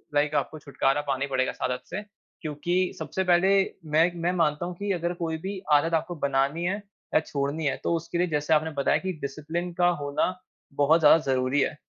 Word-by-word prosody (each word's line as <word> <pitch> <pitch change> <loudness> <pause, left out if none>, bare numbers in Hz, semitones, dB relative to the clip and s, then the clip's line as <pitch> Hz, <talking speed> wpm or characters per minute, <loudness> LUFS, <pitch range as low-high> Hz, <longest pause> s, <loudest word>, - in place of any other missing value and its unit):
Like 150 +1 +2
आपको 145 +2 -1
छुटकारा 140 0 0
पाना 135 -2 -2
ही - - -1
पड़ेगा 130 -1 +1
इस - - -16
आदत 125 0 -1
से, 190 +4 -4 0.4
क्योंकि 175 +4 -1
सबसे 190 - -2
पहले 180 +1 +4 0.4
मैं 160 +2 +5
इक 175 - -6
मैं 170 +1 0
मानता 165 -2 +1
हूँ, 180 - -5
कि 200 +3 -3
अगर 175 -1 -1
कोई 165 -2 -3
भी 190 +3 -5
आदत 165 +3 +3
आपको 165 +2 0
बनानी 140 +3 0
है 190 - +1 0.4
या - - +6
छोड़नी 150 0 -3
है 140 - 0
तो, 170 - +1
उसके 165 +1 -3
लिए 180 +1 +2
जैसे 150 0 0
आपने 155 +1 +2
बताया 140 -2 +1
कि 190 -1 -3
डिसिप्लिन 160 +5 -4
का 175 0 +3
होना 145 +5 0 0.4
बहुत 150 +4 +4
ज़्यादा 150 +1 +7
ज़रूरी 130 +2 +1
है। 150 - -1
160 Hz, 210 wpm, -26 LUFS, 145-175 Hz, 0.4 s, ज़्यादा